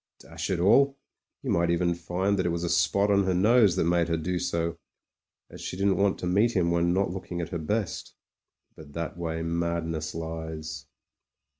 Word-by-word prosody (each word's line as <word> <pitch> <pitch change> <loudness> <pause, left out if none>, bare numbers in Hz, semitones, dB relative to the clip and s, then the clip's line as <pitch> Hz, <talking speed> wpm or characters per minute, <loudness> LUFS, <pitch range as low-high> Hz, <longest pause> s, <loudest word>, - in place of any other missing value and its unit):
Dash 80 +2 -6
it 95 - +1
all! 135 +10 +4 0.5
you - - -1
might 85 0 +2
even 85 0 +2
find 95 +4 -1
that 95 - +1
it - - +1
was 85 0 -2
a 85 - -1
spot 100 +4 +2
on 100 -1 +3
her 95 -1 +1
nose 105 0 +5
that - - +1
made 85 0 +2
her 85 -1 0
do 90 +3 -2
so, 85 -1 -2 0.7
as - - -10
she 90 - -5
didn't 100 -1 +2
want 100 -1 +2
to - - -5
meet 105 +7 +2
him 85 -3 +2
when 85 0 +2
not 95 0 +1
looking 90 -1 -5
at 85 - -3
her 85 - -3
best! 100 +5 -3 0.6
But 75 -2 -13
that 85 +1 -4
way 80 -1 -3
madness 85 -2 -2
lies. 80 -1 -6
85 Hz, 195 wpm, -27 LUFS, 85-95 Hz, 0.7 s, nose